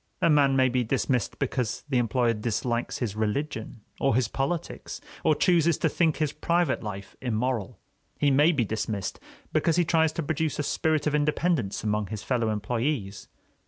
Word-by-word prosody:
A 170 Hz, -, +3 dB
man 140 Hz, -2 st, +4 dB
may 130 Hz, -1 st, +4 dB
be 125 Hz, 0 st, +1 dB
dismissed 125 Hz, +1 st, 0 dB
because 125 Hz, -4 st, -2 dB
the 130 Hz, -4 st, +1 dB
employer 120 Hz, 0 st, +2 dB
dislikes 120 Hz, +2 st, -2 dB
his 110 Hz, -5 st, -3 dB
religion 110 Hz, +1 st, -3 dB, 0.2 s
or 135 Hz, -4 st, +2 dB
his 125 Hz, -2 st, +2 dB
politics, 140 Hz, +7 st, -3 dB, 0.2 s
or 155 Hz, -, +4 dB
chooses 170 Hz, -2 st, +3 dB
to -, -, +1 dB
think 165 Hz, -3 st, +1 dB
his 155 Hz, -2 st, 0 dB
private 170 Hz, +2 st, +1 dB
life 100 Hz, -2 st, -7 dB
immoral. 120 Hz, -3 st, -1 dB, 0.4 s
He 145 Hz, -1 st, +3 dB
may 145 Hz, +5 st, +5 dB
be 135 Hz, -8 st, +1 dB
dismissed 110 Hz, -2 st, -3 dB, 0.3 s
because 165 Hz, -, +2 dB
he 175 Hz, 0 st, +3 dB
tries 160 Hz, -1 st, +3 dB
to 165 Hz, -, -2 dB
produce 155 Hz, +1 st, -1 dB
a 150 Hz, -, -1 dB
spirit 155 Hz, +1 st, 0 dB
of 150 Hz, -, +1 dB
independence 150 Hz, -, 0 dB
among 105 Hz, -1 st, 0 dB
his 105 Hz, 0 st, -6 dB
fellow 120 Hz, -4 st, 0 dB
employees. 110 Hz, 0 st, -2 dB
130 Hz, 170 wpm, -27 LUFS, 110-150 Hz, 0.4 s, may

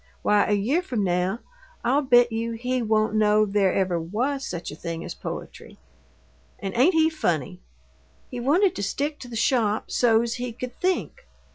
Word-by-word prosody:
Why, 210 Hz, -1 st, +3 dB
a 210 Hz, -, +1 dB
year 235 Hz, -, +1 dB
from 245 Hz, -, -2 dB
now 180 Hz, +4 st, 0 dB, 0.4 s
I'll 275 Hz, +4 st, +2 dB
bet 245 Hz, -3 st, +4 dB
you 230 Hz, +1 st, -2 dB
he 250 Hz, +2 st, -2 dB
won't 215 Hz, -1 st, +1 dB
know 215 Hz, 0 st, +3 dB
there 200 Hz, -2 st, +2 dB
ever 185 Hz, -3 st, 0 dB
WAS 250 Hz, -, -2 dB
such 175 Hz, -1 st, -5 dB
a -, -, -8 dB
thing 165 Hz, 0 st, -6 dB
as -, -, -5 dB
poetry! -, -, -8 dB, 0.8 s
And 195 Hz, -2 st, -5 dB
ain't 290 Hz, +9 st, +4 dB
he 320 Hz, 0 st, +5 dB
funny? 160 Hz, -, -2 dB, 0.7 s
He 245 Hz, -, -5 dB
wanted 330 Hz, +10 st, +2 dB
to -, -, -3 dB
stick 285 Hz, +9 st, -2 dB
to 250 Hz, -, -9 dB
the 240 Hz, -, -8 dB
shop 225 Hz, -2 st, +1 dB
so's 235 Hz, -1 st, +2 dB
he 250 Hz, -2 st, -4 dB
could 245 Hz, +1 st, -7 dB
'think'! 375 Hz, +7 st, -2 dB
230 Hz, 175 wpm, -24 LUFS, 200-255 Hz, 0.8 s, he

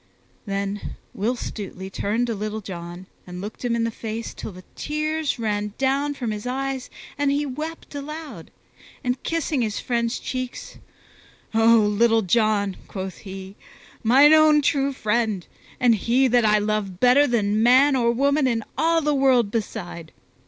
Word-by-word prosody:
Then 200 Hz, +1 st, -3 dB, 0.2 s
Will 225 Hz, +6 st, -1 dB
Stutely 190 Hz, -5 st, -7 dB
turned 220 Hz, +5 st, -1 dB
to 235 Hz, -, -2 dB
Little 215 Hz, +1 st, -4 dB
John 175 Hz, -1 st, -8 dB, 0.2 s
and 180 Hz, 0 st, -7 dB
looked 205 Hz, +6 st, -7 dB
him 240 Hz, -1 st, 0 dB
in 230 Hz, -, 0 dB
the 230 Hz, -, -1 dB
face 225 Hz, +1 st, -5 dB
till -, -, -7 dB
the 185 Hz, 0 st, -12 dB
tears 305 Hz, 0 st, -2 dB
ran 210 Hz, -2 st, -2 dB
down 275 Hz, +2 st, 0 dB
from 240 Hz, -5 st, -3 dB
his 210 Hz, +2 st, -5 dB
eyes 265 Hz, 0 st, -3 dB, 0.3 s
and 285 Hz, -1 st, +2 dB
he 285 Hz, +1 st, +1 dB
wept 305 Hz, +5 st, -6 dB
aloud; 300 Hz, +2 st, -7 dB, 0.5 s
and 250 Hz, 0 st, -1 dB
kissing 320 Hz, -4 st, -1 dB
his 215 Hz, -3 st, -1 dB
friend's 235 Hz, -1 st, -1 dB
cheeks, 255 Hz, -1 st, -6 dB, 0.7 s
"O 225 Hz, +1 st, +5 dB
Little 225 Hz, +2 st, +3 dB
John!" 205 Hz, 0 st, +1 dB
quoth 190 Hz, -1 st, -6 dB
he, 190 Hz, 0 st, -9 dB, 0.5 s
"mine 275 Hz, +7 st, +6 dB
own 310 Hz, -1 st, +6 dB
true 275 Hz, 0 st, +2 dB
friend, 215 Hz, -6 st, -1 dB, 0.3 s
and 245 Hz, -2 st, +5 dB
he 240 Hz, +5 st, +2 dB
that 240 Hz, -2 st, +3 dB
I 210 Hz, 0 st, +5 dB
love 205 Hz, -3 st, -2 dB
better 255 Hz, +5 st, +5 dB
than 215 Hz, -3 st, +1 dB
man 260 Hz, +4 st, +5 dB
or 235 Hz, -2 st, +3 dB
woman 280 Hz, +3 st, +2 dB
in 230 Hz, -3 st, 0 dB, 0.2 s
all 330 Hz, +1 st, +3 dB
the 300 Hz, -1 st, +1 dB
world 260 Hz, -6 st, +3 dB
beside! 175 Hz, -7 st, -5 dB
235 Hz, 160 wpm, -23 LUFS, 210-270 Hz, 0.7 s, mine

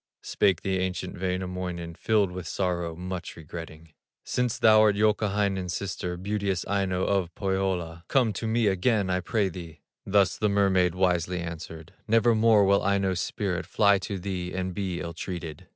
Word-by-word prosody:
Spake 95 Hz, -5 st, +1 dB
the 95 Hz, -1 st, 0 dB
ancient 90 Hz, -2 st, -3 dB
Wainamoinen:, 90 Hz, -2 st, -3 dB
Filled 105 Hz, +1 st, +1 dB
with 90 Hz, -1 st, -6 dB
sorrow, 85 Hz, -3 st, -2 dB
much 90 Hz, +1 st, -6 dB
regretting: 80 Hz, -1 st, -10 dB, 0.3 s
"Since 125 Hz, -1 st, -1 dB
thou'rt 110 Hz, -3 st, +5 dB
Youkahainen's 100 Hz, -3 st, +1 dB
sister, 90 Hz, -2 st, -4 dB
Beauteous 100 Hz, -1 st, -2 dB
Aino 95 Hz, -2 st, 0 dB
of 95 Hz, -4 st, 0 dB
Pohyola, 95 Hz, -4 st, -2 dB
Come 125 Hz, -6 st, +2 dB
to 110 Hz, +3 st, -4 dB
me 115 Hz, +1 st, +1 dB
again 100 Hz, 0 st, +2 dB
I 90 Hz, -, +1 dB
pray 100 Hz, +2 st, 0 dB
thee!" 85 Hz, -5 st, -9 dB, 0.2 s
Thus 100 Hz, -2 st, +2 dB
the 105 Hz, -, +2 dB
mermaid 95 Hz, -3 st, +2 dB
wisely 90 Hz, -1 st, +1 dB
answered: 80 Hz, +1 st, -7 dB
"Nevermore 115 Hz, -2 st, +4 dB
will 100 Hz, +1 st, +4 dB
Aino's 100 Hz, -2 st, +1 dB
spirit 95 Hz, -4 st, -2 dB
Fly 100 Hz, -2 st, +4 dB
to 95 Hz, +1 st, -4 dB
thee 90 Hz, -1 st, -4 dB
and 95 Hz, 0 st, -3 dB
be 95 Hz, -3 st, -3 dB
ill 85 Hz, -1 st, -5 dB
treated." 85 Hz, -3 st, -6 dB
95 Hz, 150 wpm, -27 LUFS, 90-100 Hz, 0.3 s, thou'rt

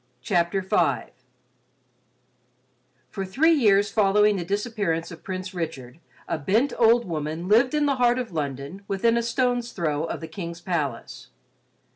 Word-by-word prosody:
CHAPTER 175 Hz, 0 st, +1 dB
V 170 Hz, -7 st, 0 dB, 2.0 s
For 195 Hz, -, -4 dB
three 270 Hz, -, +2 dB
years 205 Hz, -9 st, +3 dB
following 210 Hz, 0 st, +3 dB
the 175 Hz, -, -3 dB
disappearance 200 Hz, -4 st, -2 dB
of 160 Hz, -, -11 dB
Prince 185 Hz, 0 st, -5 dB
Richard, 155 Hz, -6 st, -6 dB, 0.3 s
a -, -, -2 dB
bent 220 Hz, -, +1 dB
old 235 Hz, +1 st, +5 dB
woman 160 Hz, +1 st, -4 dB
lived 240 Hz, +7 st, +4 dB
in 300 Hz, -1 st, +2 dB
the 280 Hz, -2 st, +1 dB
heart 245 Hz, 0 st, +3 dB
of 245 Hz, -4 st, -4 dB
London 145 Hz, +3 st, -4 dB
within 230 Hz, +4 st, +1 dB
a 235 Hz, -, +2 dB
stone's 245 Hz, 0 st, -1 dB
throw 155 Hz, -4 st, -1 dB
of -, -, -4 dB
the 160 Hz, -, -7 dB
King's 170 Hz, 0 st, -7 dB
palace. 155 Hz, -9 st, -4 dB
195 Hz, 145 wpm, -24 LUFS, 165-230 Hz, 2.0 s, old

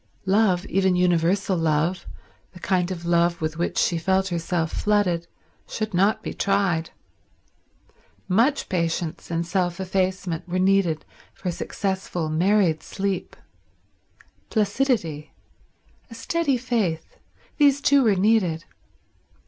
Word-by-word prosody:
Love, 190 Hz, -2 st, +2 dB
even 190 Hz, -2 st, +1 dB
universal 180 Hz, +2 st, +2 dB
love, 165 Hz, +2 st, 0 dB, 0.5 s
the 180 Hz, -, -12 dB
kind 180 Hz, -1 st, 0 dB
of 175 Hz, -2 st, -6 dB
love 170 Hz, 0 st, +2 dB
with 155 Hz, 0 st, -3 dB
which 175 Hz, -, -1 dB
she 170 Hz, -, +2 dB
felt 190 Hz, +3 st, +1 dB
herself 170 Hz, -1 st, -1 dB
flooded, 185 Hz, -5 st, 0 dB, 0.4 s
should 215 Hz, -2 st, -4 dB
not 195 Hz, +4 st, +2 dB
be -, -, -4 dB
tried. 195 Hz, -5 st, 0 dB, 1.4 s
Much 235 Hz, +10 st, +2 dB
patience 170 Hz, -2 st, -2 dB
and 170 Hz, 0 st, -1 dB
self 175 Hz, 0 st, -1 dB
effacement 185 Hz, -2 st, -2 dB
were 180 Hz, -, -1 dB
needed 185 Hz, -4 st, +2 dB, 0.3 s
for 180 Hz, -, -3 dB
successful 185 Hz, -2 st, -3 dB
married 175 Hz, 0 st, +2 dB
sleep. 195 Hz, -1 st, -3 dB, 1.1 s
Placidity; 205 Hz, -, 0 dB, 0.8 s
a 230 Hz, -, -10 dB
steady 285 Hz, +3 st, 0 dB
faith; 220 Hz, -10 st, -2 dB, 0.4 s
these 285 Hz, -2 st, +4 dB
too 280 Hz, 0 st, +4 dB
were 220 Hz, -5 st, +3 dB
needed. 185 Hz, -5 st, +2 dB
185 Hz, 115 wpm, -24 LUFS, 170-200 Hz, 1.4 s, these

